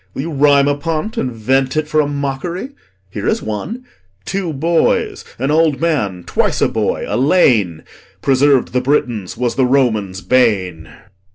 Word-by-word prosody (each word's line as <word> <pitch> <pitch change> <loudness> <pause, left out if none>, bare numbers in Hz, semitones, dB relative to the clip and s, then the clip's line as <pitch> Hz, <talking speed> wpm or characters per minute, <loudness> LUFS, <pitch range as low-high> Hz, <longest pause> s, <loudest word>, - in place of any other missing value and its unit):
Will - - -2
you 165 - -5
rhyme 140 -1 +4
upon't, 155 +8 -2
And 130 - -2
vent 130 +5 0
it 155 -1 0
for 155 0 +2
a 145 - -1
mock'ry? 145 - -4 0.4
Here 100 0 -4
is - - 0
one: 190 - -5 0.4
'Two 190 -4 -2
boys, 160 +4 0
an 135 +4 -1
old 155 -2 +2
man 110 - -1
(twice - - 0
a - - +3
boy), - - -2
a 105 - -2
lane, 120 - +2 0.4
Preserv'd 135 -1 +2
the 125 - +1
Britons, 120 -8 -1
was 125 -2 -1
the 130 - +2
Romans' 110 -8 0
bane.' 100 -11 +1
135 Hz, 160 wpm, -17 LUFS, 115-155 Hz, 0.4 s, rhyme